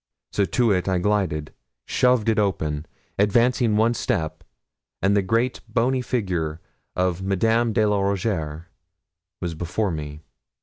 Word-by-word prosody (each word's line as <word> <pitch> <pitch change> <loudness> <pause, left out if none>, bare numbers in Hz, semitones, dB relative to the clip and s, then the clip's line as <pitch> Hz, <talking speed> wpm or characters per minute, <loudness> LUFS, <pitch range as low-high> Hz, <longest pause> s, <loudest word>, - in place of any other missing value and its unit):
So 100 - +1
to 120 +2 +2
it 90 -2 +1
I 95 -1 +2
glided, 90 -6 0 0.3
shoved 125 -3 +2
it 110 -1 +3
open, 80 -6 -1 0.3
advancing 115 +2 +3
one 115 +2 +3
step, 95 -10 -2 0.6
and 100 +2 +2
the 100 - +4
great 115 +6 0
bony 125 +2 +1
figure 90 -11 -2 0.4
of 90 0 0
Madame 110 +5 +2
de 110 -1 +2
la 105 -1 +2
Rougierre 90 -6 -1 0.8
was 85 -2 -2
before 90 +5 -2
me. 75 -1 -6
100 Hz, 135 wpm, -23 LUFS, 85-115 Hz, 0.8 s, the